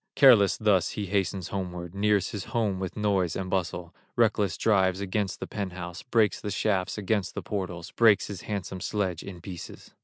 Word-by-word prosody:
Careless 120 -8 +6
thus 95 -5 +3
he 105 - -1
hastens 95 -2 -1
homeward, 90 -3 -5
Nears 100 -1 +1
his 100 -3 -5
home 105 -5 -1
with 95 +1 -5
noise 100 -5 +1
and 95 -1 -4
bustle, 90 -2 -2 0.2
Reckless 105 -5 +2
drives 95 -3 +2
against 100 0 -2
the - - -4
pent 100 -3 -4
house, 90 -1 -7
Breaks 115 -5 +1
the 105 - -4
shafts 100 -1 0
against 105 -2 -1
the - - -4
portals, 90 -4 -4
Breaks 110 -4 +5
his 100 -4 -7
handsome 95 -3 -4
sledge 95 -5 -1
in 90 -3 -9
pieces. 90 -2 -9
95 Hz, 180 wpm, -27 LUFS, 90-105 Hz, 0.2 s, Careless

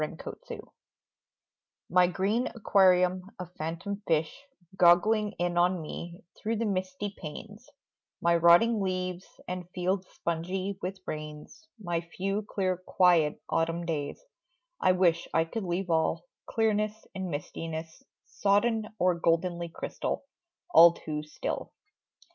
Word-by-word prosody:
THE 155 +2 -5
REEF - - -5 1.3
My 180 +1 +4
green 200 +8 0
aquarium 185 -4 +4 0.2
of 180 -1 -8
phantom 180 +6 -4
fish, 165 - -1 0.3
Goggling 200 +4 +4
in 175 0 0
on 180 +1 +3
me 170 +2 -7
through 225 +2 -2
the 230 +1 -1
misty 190 0 -2
panes; 205 +9 -9 0.5
My 170 0 +3
rotting 175 +7 +5
leaves 185 -1 -2 0.2
and 180 -1 -5
fields 185 +1 -1
spongy 185 +4 -3
with 190 +1 -5
rains; 155 - -7
My 175 -4 -2
few 195 +4 -3
clear 190 -3 -1
quiet 175 -4 +3
autumn 165 +1 0
days 150 -4 -3 0.6
I 185 - +5
wish 175 -2 +2
I 165 0 +4
could 205 +5 -4
leave 180 +1 -2
all, 160 +1 +1 0.2
clearness 215 -1 0
and 190 -1 -4
mistiness; 160 +1 -5 0.2
Sodden 215 +2 +1
or 180 -2 +3
goldenly 170 +1 0
crystal, - - -4 0.5
all 170 0 +9
too 150 -2 -5
still. 150 0 -5
180 Hz, 125 wpm, -29 LUFS, 170-195 Hz, 1.3 s, all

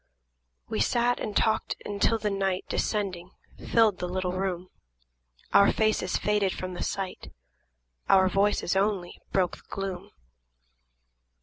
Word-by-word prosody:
We - - -3
sat 240 - +2
and 210 - -2
talked 220 0 +1
until 205 +2 +1
the 210 -1 -2
night, 195 -1 -1
Descending, 185 -4 -2 0.4
filled 220 -5 +4
the 180 - -2
little 185 0 -1
room; 185 -1 -3 0.8
Our 200 - +7
faces 215 -4 +1
faded 205 -2 +1
from 185 0 -5
the - - -6
sight, 195 -2 -4 0.4
– - - -38
Our 190 -1 +6
voices 195 -1 +1
only 195 -3 -1
broke 185 -2 +1
the - - -20
gloom. 195 -2 -5
195 Hz, 130 wpm, -27 LUFS, 180-210 Hz, 0.8 s, Our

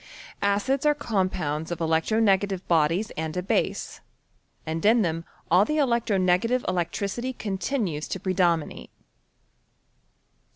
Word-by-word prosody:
Acids 205 +7 +1
are 300 0 +3
compounds 185 - -2
of 175 -1 -4
electro 165 +6 +1
negative 195 -3 +1
bodies 170 +6 +2
and 160 +1 -4
a 180 - -1
base, 190 - -1 0.6
and 160 +1 -3
in 225 +1 +5
them 165 -1 -2 0.3
all 180 +3 +6
the 305 +8 -1
electro 235 -7 +1
negative 185 +7 +2
electricity 200 +8 -2
continues 195 - -2
to - - -4
predomi 175 -4 +1
nate. - - -11
190 Hz, 125 wpm, -25 LUFS, 165-225 Hz, 0.6 s, all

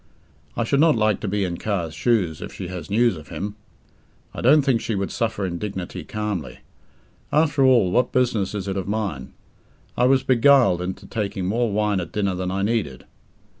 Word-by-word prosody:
I - - +1
should 140 +4 +1
not 160 -1 +5
like 110 -2 +1
to - - -4
be 100 +1 0
in 90 -2 -3
Carr's 90 -7 -2
shoes 90 -4 0
if - - -6
she 90 -3 -7
has 90 0 -7
news 115 0 +3
of 75 -2 -11
him! 100 +7 -5 0.8
I - - -6
don't 145 +4 +5
think 130 -5 +1
she 110 - -2
would 100 0 -2
suffer 110 -4 -2
indignity 90 -1 -5
calmly. 105 -6 -4 0.7
After 150 -2 +2
all, 120 -8 +4
what 125 +3 +2
business 115 -6 0
is 100 -1 -4
it 95 0 -2
of 95 - -3
mine? 100 -11 -3 0.6
I 125 - +2
was 130 0 +3
beguiled 130 -7 +4
into 90 +1 -5
taking 100 -4 -3
more 115 +4 0
wine 105 -1 +1
at 85 -2 -6
dinner 100 -2 0
than 90 0 -3
I 95 +1 -1
needed. 100 - -2
105 Hz, 190 wpm, -23 LUFS, 95-120 Hz, 0.8 s, not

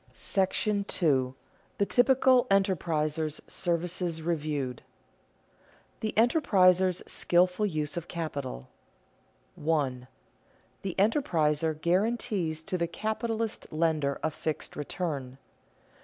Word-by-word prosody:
§ 190 +2 0 0.6
II. 130 - -16 0.4
THE 200 - +2
TYPICAL 255 +1 +4
ENTERPRISER'S 160 -5 +1
SERVICES 170 -1 -2
REVIEWED 150 -6 -2
[Sidenote: - - -34
The 215 - -2
enterpriser's 190 - +4
skilful 180 +4 +2
use 155 -5 -2
of 170 0 -4
capital] 140 - -5 0.8
1. 140 -5 -1 0.8
_The 190 -2 -3
enterpriser 160 - +1
guarantees 185 -2 0
to 185 +2 -3
the 170 - +1
capitalist 220 +3 -3
lender 155 -3 0
a 160 - +1
fixed 155 0 -4
return. 145 -4 -4
170 Hz, 95 wpm, -29 LUFS, 155-195 Hz, 0.8 s, TYPICAL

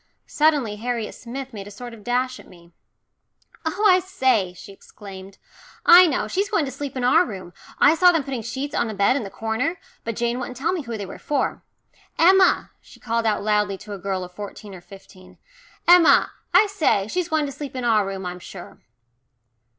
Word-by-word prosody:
Suddenly 290 -9 +1
Harriet 230 -1 -3
Smith 260 +2 -8
made 200 -2 -8
a - - -8
sort 240 +4 -9
of 220 -2 -13
dash 250 +2 -1
at - - -15
me. 170 -1 -18 0.9
"Oh, 365 +6 -1
I 370 -2 +6
say," 260 - 0
she 180 - -12
exclaimed. 195 -1 -12 0.5
"I 355 +1 +9
know. 290 - -1
She's 395 +2 -1
going 335 -8 +1
to 270 - -5
sleep 275 0 -6
in 255 - -2
our 310 +8 +5
room. 185 - -8 0.2
I 290 - +6
saw 360 +2 +5
them 325 -4 0
putting 265 -3 -4
sheets 265 +6 -5
on 235 - 0
the 215 - -5
bed 200 +5 +3
in 280 - -1
the 200 - -6
corner, 225 - -2 0.3
but 230 -1 -4
Jane 240 +2 -1
wouldn't 250 0 -6
tell 300 +7 0
me 360 - -2
who 235 -5 -6
they 200 - -5
were - - -10
for. 290 - -2 0.6
Emma," 375 +3 +4
she - - -18
called 230 -1 -1
out 210 -2 0
loudly 210 -2 +1
to 205 +2 -9
a 200 - -7
girl 190 0 -3
of 180 - -9
fourteen 205 +1 -9
or 180 - -11
fifteen, 185 0 -16 0.5
"Emma, 350 -1 +6 0.2
I 365 +4 +6
say, 315 - +1
she's 355 +7 -2
going 315 -2 +1
to 280 - -5
sleep 280 -1 -8
in 255 - -4
our 220 -3 +3
room 195 -1 -5
I'm 180 0 -5
sure." 175 0 -11
240 Hz, 205 wpm, -22 LUFS, 200-300 Hz, 0.9 s, I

